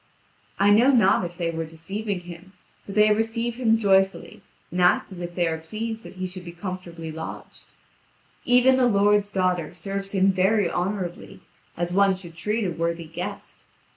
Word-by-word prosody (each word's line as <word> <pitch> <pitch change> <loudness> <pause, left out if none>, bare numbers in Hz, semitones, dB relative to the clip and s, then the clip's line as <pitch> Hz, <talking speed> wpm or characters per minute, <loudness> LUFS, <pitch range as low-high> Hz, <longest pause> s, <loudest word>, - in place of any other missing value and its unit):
I 200 +1 +4
know 230 +6 +6
not 210 -8 +4
if 175 0 -8
they 170 -2 -1
were 165 0 -3
deceiving 190 +5 -5
him, 175 +2 -12 0.3
but 200 - -7
they 210 0 +5
receive 230 +2 -2
him 225 -3 +3
joyfully 195 -3 +1 0.3
and 180 +2 -1
act 180 +3 +3
as 180 -2 -8
if 175 0 -6
they 175 - +1
are 160 -1 -1
pleased 220 +7 -5
that - - -11
he 185 0 -4
should 185 0 -7
be 175 - -8
comfortably 175 -2 -7
lodged. 160 +1 -9 0.8
Even 250 +1 +5
the 255 -1 +4
lord's 205 -1 +3
daughter 180 -4 -1
serves 195 +1 -4
him 195 0 +4
very 195 +1 +2
honourably, 180 -1 -4 0.4
as 175 +1 -2
one 195 0 +4
should 175 -3 -10
treat 210 +6 -1
a 180 - -1
worthy 170 0 -2
guest. 160 - -7
190 Hz, 175 wpm, -24 LUFS, 175-210 Hz, 0.8 s, know